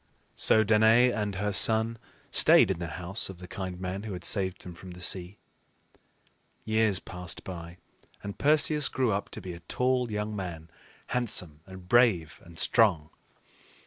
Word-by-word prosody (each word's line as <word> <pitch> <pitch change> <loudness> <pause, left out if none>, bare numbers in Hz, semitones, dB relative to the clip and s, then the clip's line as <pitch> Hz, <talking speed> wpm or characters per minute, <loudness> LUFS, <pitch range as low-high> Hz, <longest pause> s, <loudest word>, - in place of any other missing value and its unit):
So 110 0 +3
Danaë 110 +3 +4
and 105 -2 -3
her 105 +2 -2
son 110 +2 +2 0.3
stayed - - +6
in 90 - -3
the 85 - -4
house 90 +5 -4
of 95 - -9
the 90 +1 -11
kind 95 -2 -6
man 95 +1 -4
who 105 -2 -6
had 90 -1 -7
saved 95 -1 0
them 90 - -9
from 90 +1 -11
the 90 - -12
sea. 90 +2 0 1.3
Years 110 -2 +1
passed 90 -3 -7
by, 85 -1 -9 0.5
and 100 -1 -7
Perseus 150 0 +3
grew 130 -3 0
up 100 0 -3
to - - -9
be 90 - -7
a 85 - -10
tall 125 +7 -1
young 105 0 -3
man, 85 -4 -7 0.4
handsome, 90 -11 -2
and 95 -1 -12
brave, 105 -8 +2
and 85 -1 -15
strong. 90 -11 +2
95 Hz, 165 wpm, -28 LUFS, 90-110 Hz, 1.3 s, stayed